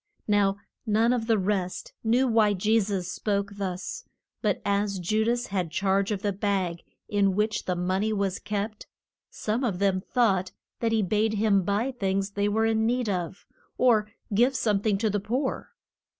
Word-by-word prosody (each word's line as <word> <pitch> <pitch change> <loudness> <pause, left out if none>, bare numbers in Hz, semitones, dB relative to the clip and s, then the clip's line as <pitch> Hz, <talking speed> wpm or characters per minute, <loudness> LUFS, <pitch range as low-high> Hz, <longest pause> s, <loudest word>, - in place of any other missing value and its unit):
Now 200 -2 +3 0.3
none 225 +3 +3
of 230 -2 -2
the 225 -2 +3
rest 190 -2 -2
knew 240 +4 +3
why 220 -3 +4
Je 215 +4 +3
sus 195 -4 -2
spoke 200 +1 -2
thus. 185 -2 -4 0.4
But - - +1
as 200 0 0
Ju 215 +5 +1
das 240 +2 0
had 185 -4 -2
charge 195 +3 +1
of 205 -2 -2
the 205 -1 0
bag 190 -4 -1 0.3
in 200 -2 +2
which 215 +1 0
the 180 - 0
mon 185 +2 0
ey 220 - 0
was 200 -2 -1
kept, 210 +1 -4 0.4
some 220 +5 -2
of 210 -8 0
them 190 -1 +1
thought 195 -6 +1 0.3
that 230 -1 0
he 220 -2 +2
bade 215 +3 +1
him 205 -2 +3
buy 205 +8 0
things 195 -4 -1
they 205 +1 0
were 220 +2 +2
in 220 0 +2
need 245 -1 0
of, 180 -1 -3 0.3
or 220 -4 +3 0.2
give 245 +6 +3
some 210 -5 +1
thing 205 -1 +1
to 220 +2 +1
the 205 - 0
poor. 250 +7 -2
205 Hz, 180 wpm, -27 LUFS, 195-220 Hz, 0.4 s, why